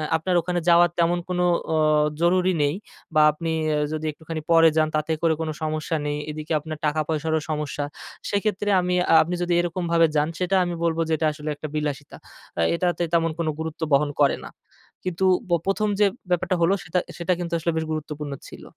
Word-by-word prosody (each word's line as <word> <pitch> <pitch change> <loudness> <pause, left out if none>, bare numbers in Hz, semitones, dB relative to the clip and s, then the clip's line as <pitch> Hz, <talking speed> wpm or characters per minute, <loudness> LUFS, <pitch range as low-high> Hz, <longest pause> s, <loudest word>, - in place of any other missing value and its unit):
আপনার 175 +3 0
ওখানে 175 +1 -1
যাওয়ার 175 0 +6
তেমন 170 +1 +2
কোনো 180 0 +1 0.3
ওঁ 155 -1 +3 0.2
জরুরি 185 +1 +3
নেই। 145 +2 +1 0.4
বা 155 - +5
আপনি 165 +2 -4 0.2
এ - - +1 0.2
যদি 155 0 -3
একটুখানি 160 +1 -7
পরে 165 0 +7
যান, 155 - +4
তাতে 155 +1 -1
করে 165 -1 +3
কোন 160 - -2
সমস্যা 155 +1 -2
নেই। 145 0 -1
এদিকে 155 +1 -4
আপনার 155 0 -7
টাকা 150 +1 +1
পয়সারও 160 0 0
সমস্যা। 150 -1 -2 0.4
সেক্ষেত্রে 205 0 -1
আমি 180 0 0 0.2
আ - - +6
আপনি 175 +3 -3
যদি 175 0 0
এরকম 175 +1 -3
ভাবে 165 0 +5
যান, 150 +1 +3
সেটা 185 +1 +1
আমি 175 - -2
বলবো 165 0 +1
যে, 160 - +1
এটা 155 0 +1
আসলে 150 0 -6
একটা 155 - -6
বিলাসিতা। 145 -2 -3 0.4
আ - - +3
এটাতে 175 0 0
তেমন 165 -1 +2
কোন 165 - -1
গুরুত্ব 160 +1 -5
বহন 145 +1 +4
করে 140 - +4
না। - - -8 0.5
কিন্তু 185 +1 -1 0.2
ব - - -7
১ম 210 +2 +1
যে, 205 - +6 0.2
ব্যাপারটা 180 +1 +1
হলো, 170 +4 +4
সেটা 180 +2 0
আ - - -7
সেটা 175 +1 0
কিন্তু 170 -1 -4
আসলে 170 +1 0
বেশ 160 - -1
গুরুত্বপূর্ণ 150 -1 -4 0.2
ছিল। - - -11
165 Hz, 200 wpm, -24 LUFS, 155-175 Hz, 0.5 s, পরে